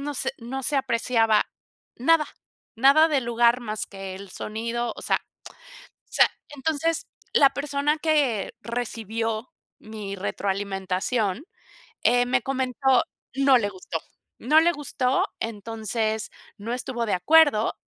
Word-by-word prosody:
no 290 +1 -3
se - - -1
no 260 +3 -5
se 290 - +1
apreciaba 230 -4 +2 0.5
nada, 305 +4 +3 0.5
nada 280 +7 +6
del 275 -5 +1
lugar 235 +1 +3
más 215 -2 -4
que 195 -1 -8
el 200 0 -10
sonido, 230 +4 -3
o - - -8
sea - - +1 0.9
o - - -30
sea, - - +5 0.2
entonces, 320 +3 -1 0.3
la 275 -1 +6
persona 285 +1 -1
que 285 -10 +1
recibió 225 - -3 0.3
mi 210 -2 -7
retroalimentación, 195 +3 -2 0.6
eh, 245 0 +4
me 250 -1 +1
comentó 260 -1 +1 0.3
no 270 -2 +5
le 205 -3 -1
gustó, 180 -4 -5 0.4
no 305 +6 +5
le 340 +1 +4
gustó, 265 -3 0
entonces, 220 0 -2 0.3
no 225 +4 -5
estuvo 245 -2 -3
de 205 - +1
acuerdo, 290 - +4
235 Hz, 130 wpm, -25 LUFS, 215-275 Hz, 0.9 s, nada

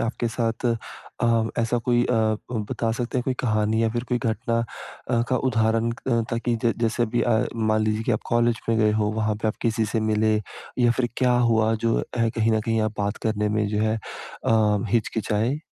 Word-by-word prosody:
आपके 115 0 -1
साथ 115 +1 -2 0.6
अ, 115 -1 +3
ऐसा 115 +1 +1
कोई 120 0 +3
अ, - - 0 0.4
उ 120 - -2
बता 115 -1 -1
सकते 120 +2 -2
हैं - - 0
कोई 130 - 0
कहानी 110 -1 +1
या 115 - +3
फिर 120 +2 -3
कोई 125 - +1
घटना 115 0 -1 0.5
अ, 115 0 +2
का 130 - +2
उदाहरण 115 -2 +1
क 115 - -7
अ, 115 -2 +3
ताकि 115 0 0
जै 115 - +4
जैसे 115 +1 +1
अभी 120 +1 0
अ, 120 0 +2
मान 110 -1 +1
लीजिए 110 +1 0
की 120 - 0
आप 105 - 0
कॉलेज 120 0 +2
में 115 -1 +2
गए 105 -1 +3
हो 105 0 +1
वहाँ 110 -1 0
पे 110 - +2
आप - - -3
किसी 115 -1 +1
से 110 +1 -1
मिले 110 0 +2 0.4
या 120 -1 +4
फिर 120 0 0
क्या 125 -1 +3 0.2
हुआ 110 0 +3
जो 115 +1 0
अ, - - -1 0.3
कहीं 115 -1 +2
न 110 - +2
कहीं 115 0 0
आप 110 0 -1
बात 100 +1 -1
करने 105 -1 0
में 105 0 0
जो 105 0 -1
है 110 0 +1 0.5
अ, 110 -2 +3
हिचकिचाए? 110 +3 0
115 Hz, 220 wpm, -24 LUFS, 110-120 Hz, 0.6 s, जै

